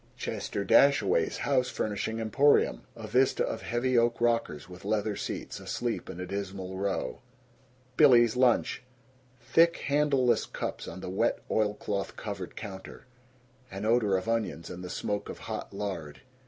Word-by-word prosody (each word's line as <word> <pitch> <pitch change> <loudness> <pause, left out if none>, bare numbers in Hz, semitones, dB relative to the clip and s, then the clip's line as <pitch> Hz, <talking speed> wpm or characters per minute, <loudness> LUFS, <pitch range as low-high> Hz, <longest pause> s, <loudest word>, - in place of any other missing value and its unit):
Chester 100 - -3
Dashaway's 105 - +4
House 130 -3 +1
Furnishing 110 +1 -2
Emporium. 135 +6 +3
A 115 -2 -8
vista 125 +5 +2
of 110 - -4
heavy 120 +3 0
oak 115 0 +1
rockers 115 -11 0
with 90 0 -12
leather 105 -1 0
seats, - - -5
asleep - - -3
in 85 - -7
a 90 - -4
dismal 95 -1 -5
row. 100 0 -2 0.8
Billy's 120 -3 +6
Lunch. 125 -1 +2 0.6
Thick 165 +8 +3
handleless 140 -4 +2
cups - - -5
on 95 +2 -7
the - - -5
wet 95 - +1
oilcloth 105 -2 -1
covered 100 -4 -6
counter. 95 +2 -9 0.6
An 95 +2 -5
odor 110 -4 +3
of 95 - -5
onions 110 -8 -2
and 90 +1 -7
the 90 - -6
smoke 105 +2 -3
of - - -6
hot - - -6
lard. 95 -7 -5
105 Hz, 145 wpm, -29 LUFS, 95-120 Hz, 0.8 s, Billy's